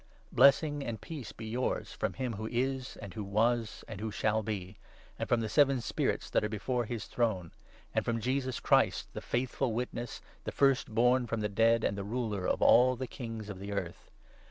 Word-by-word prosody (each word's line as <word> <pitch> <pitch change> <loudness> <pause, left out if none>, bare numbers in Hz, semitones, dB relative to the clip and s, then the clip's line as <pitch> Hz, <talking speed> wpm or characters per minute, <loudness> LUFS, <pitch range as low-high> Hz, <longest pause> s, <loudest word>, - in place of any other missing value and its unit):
4 - - -17
Blessing 145 +1 +5
and 115 -4 -4
peace 155 -8 -7
be 110 - -9
yours 120 +4 -2
from - - -2
him 130 -3 -3
who 110 +1 -4
is, 130 +2 -2
and 95 - -8
who 105 - -4
was, 110 +3 0
and 105 -2 -7
who 110 - -2
shall 110 +1 +1
be, 100 -2 -5 0.4
and - - -3
from 120 - +3
the 110 - -1
seven 135 +3 +4
Spirits 115 - -1
that - - +2
are 105 - 0
before 120 +3 -1
his 110 -2 -4
throne, 100 -8 -1 0.4
and - - +1
from 115 -1 -1
Jesus 130 +2 -1
Christ, - - +2
' - - -28
the - - -5
faithful 125 0 -1
Witness, 120 0 -4 0.2
the - - -4
5 - - -23
First 135 -5 +3
born 125 +2 +4
from 115 -1 -2
the 105 - 0
dead, 115 +3 +3
and 100 - +1
the 100 - -4
Ruler 105 -3 -2
of - - +1
all 130 +1 +6
the 130 +1 -4
Kings 115 -4 -6
of 100 -3 -7
the 100 +1 -5
earth.' 100 - -5
115 Hz, 215 wpm, -31 LUFS, 105-125 Hz, 0.4 s, all